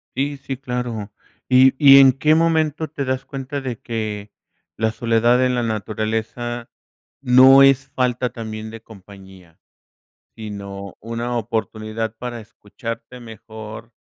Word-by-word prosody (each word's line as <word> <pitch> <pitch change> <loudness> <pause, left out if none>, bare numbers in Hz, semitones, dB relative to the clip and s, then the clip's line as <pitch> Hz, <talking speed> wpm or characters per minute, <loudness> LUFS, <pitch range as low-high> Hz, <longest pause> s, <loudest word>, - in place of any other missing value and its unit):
Sí, 140 +2 -1
sí, 135 -1 -6
claro. 125 -5 -4 0.4
¿Y 130 +1 +6
y 140 -1 +8
en 135 -1 +7
qué 150 +4 +2
momento 160 -1 +1
te 140 -2 -4
das 130 0 -2
cuenta 135 +1 -6
de 125 -4 -5
que 105 -3 -5 0.5
la 110 0 0
soledad 120 +2 +2
en 125 0 +1
la 120 - 0
naturaleza 110 +2 -3 0.5
no 130 +1 +7
es 135 0 +4
falta 125 -1 -1
también 110 -1 -7
de 115 -1 -10
compañía?, 95 -5 -15 0.8
sino 100 -2 -8
una 115 +2 -4
oportunidad 110 0 -4
para 120 0 -6
escucharte 115 +3 -9
mejor 110 0 -10
115 Hz, 130 wpm, -21 LUFS, 110-130 Hz, 0.8 s, y